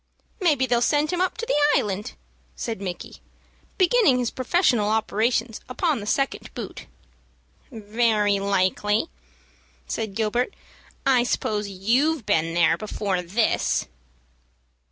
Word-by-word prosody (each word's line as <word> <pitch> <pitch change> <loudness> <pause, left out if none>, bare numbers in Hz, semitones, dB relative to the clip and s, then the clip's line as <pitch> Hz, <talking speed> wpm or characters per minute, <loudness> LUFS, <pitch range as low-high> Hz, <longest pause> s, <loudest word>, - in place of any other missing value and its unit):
"Maybe 300 -9 +2
they'll 240 -2 +1
send 295 +6 +2
him 355 - -1
to 375 +5 -1
the 380 -11 +1 0.2
Island," 205 0 -4 0.4
said 225 -4 -4
Micky, 180 -3 -6 0.6
beginning 370 - +4
his 245 -2 -1
professional 255 - +1
operations 220 +1 0
upon 295 +1 0
the 205 - -7
second 275 +5 -1
boot. - - -7 0.8
"Very 215 -2 +1
likely," 200 - +1 0.8
said 220 -3 -4
Gilbert. 230 - -1 0.5
"I 260 -2 +4
suppose 215 -3 -1
you've 240 +9 +1
been 165 +1 +1
there 170 -1 +3
before 200 -3 -2
this." 200 +6 0
225 Hz, 115 wpm, -24 LUFS, 205-270 Hz, 0.8 s, beginning